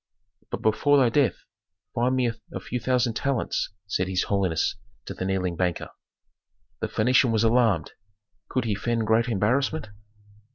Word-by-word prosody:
"But -, -, -5 dB
before 145 Hz, +7 st, +3 dB
thy 130 Hz, -3 st, +4 dB
death, 125 Hz, -4 st, +1 dB, 0.5 s
find 125 Hz, +2 st, +1 dB
me 125 Hz, -2 st, +1 dB, 0.2 s
a -, -, -4 dB
few 125 Hz, -, -4 dB
thousand 125 Hz, 0 st, +1 dB
talents," 135 Hz, 0 st, -1 dB, 0.2 s
said 95 Hz, -1 st, -1 dB
his 95 Hz, -1 st, 0 dB
holiness 95 Hz, -5 st, 0 dB, 0.3 s
to -, -, -6 dB
the 95 Hz, -, -4 dB
kneeling 95 Hz, -2 st, -1 dB
banker. 90 Hz, -1 st, -1 dB, 0.9 s
The -, -, -2 dB
Phœnician 125 Hz, +2 st, +3 dB
was 110 Hz, 0 st, +2 dB
alarmed. 115 Hz, -8 st, +2 dB, 0.6 s
Could 130 Hz, -2 st, -1 dB
he 110 Hz, -, 0 dB
feign 115 Hz, +2 st, -1 dB
great 110 Hz, +2 st, +3 dB
embarrassment? 125 Hz, +6 st, 0 dB
115 Hz, 150 wpm, -25 LUFS, 95-125 Hz, 0.9 s, thy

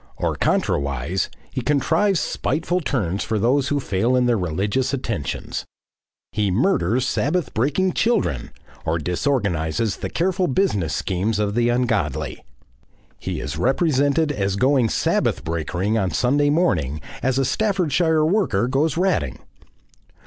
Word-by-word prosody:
Or -, -, -1 dB
contrawise 70 Hz, +6 st, 0 dB, 0.2 s
he 130 Hz, -, -3 dB
contrives 160 Hz, -, +2 dB
spiteful 170 Hz, +7 st, -1 dB
turns 100 Hz, -, -1 dB
for 110 Hz, -, -1 dB
those 130 Hz, +6 st, +2 dB
who 145 Hz, 0 st, 0 dB
fail 115 Hz, +1 st, 0 dB
in 125 Hz, -1 st, +3 dB
their 120 Hz, -1 st, +3 dB
religious 105 Hz, -, -1 dB
attentions. 115 Hz, -, -4 dB, 0.7 s
He 105 Hz, -2 st, 0 dB
murders 125 Hz, -, +1 dB
Sabbath 150 Hz, +6 st, 0 dB
breaking 150 Hz, +11 st, +1 dB
children, 75 Hz, -, 0 dB, 0.3 s
or 80 Hz, +1 st, 0 dB
disorganises 90 Hz, -, -1 dB
the -, -, -4 dB
careful 185 Hz, +1 st, 0 dB
business 105 Hz, -, 0 dB
schemes 100 Hz, +7 st, -1 dB
of 105 Hz, -1 st, 0 dB
the 120 Hz, +1 st, +2 dB
ungodly. 115 Hz, -, -1 dB, 0.8 s
He -, -, -4 dB
is 70 Hz, +1 st, -4 dB
represented 145 Hz, +2 st, +2 dB
as 100 Hz, -7 st, -1 dB
going 130 Hz, +1 st, +3 dB
Sabbath -, -, 0 dB
breakering 90 Hz, +6 st, -1 dB
on 95 Hz, -, 0 dB
Sunday 145 Hz, +7 st, +2 dB
morning 85 Hz, -, +1 dB, 0.2 s
as 130 Hz, 0 st, +1 dB
a 135 Hz, -, +2 dB
Staffordshire 165 Hz, -, +1 dB
worker 160 Hz, -, +1 dB
goes 140 Hz, +4 st, +1 dB
ratting. 190 Hz, +2 st, 0 dB
125 Hz, 130 wpm, -22 LUFS, 95-150 Hz, 0.8 s, in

